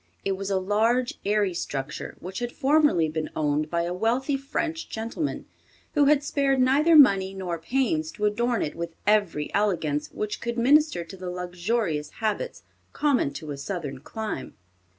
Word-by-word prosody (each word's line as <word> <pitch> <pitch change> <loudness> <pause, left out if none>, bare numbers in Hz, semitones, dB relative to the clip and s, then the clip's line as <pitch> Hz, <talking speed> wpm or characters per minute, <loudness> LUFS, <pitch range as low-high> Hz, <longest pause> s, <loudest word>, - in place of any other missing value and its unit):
It 195 - +1
was 195 +1 -3
a 195 - +1
large, 225 +6 +1
airy 205 -2 +1
structure, 140 -4 -4
which 185 +2 -6
had 240 0 -3
formerly 290 - +3
been 155 0 -3
owned 150 0 0
by 170 0 0
a 175 +1 -2
wealthy 240 +9 0
French 315 +4 -3
gentleman 230 +7 -3 0.5
who 290 -1 +4
had 290 0 +4
spared 280 -2 +1
neither 285 +6 +4
money 195 -9 +6
nor 180 -3 -3
pains 270 - 0
to 210 - -2
adorn 235 +3 +1
it 150 - -3
with 170 -1 -6
every 205 -8 +1
elegance 165 -8 0
which 210 0 -4
could 235 0 -3
minister 285 - +4
to 170 - -11
the 185 -1 -6
luxurious 180 -2 -2
habits 225 - -3 0.3
common 280 - +2
to 155 +1 -6
a 140 - -5
Southern 140 -2 -5
clime. 215 - -5
210 Hz, 165 wpm, -26 LUFS, 170-265 Hz, 0.5 s, money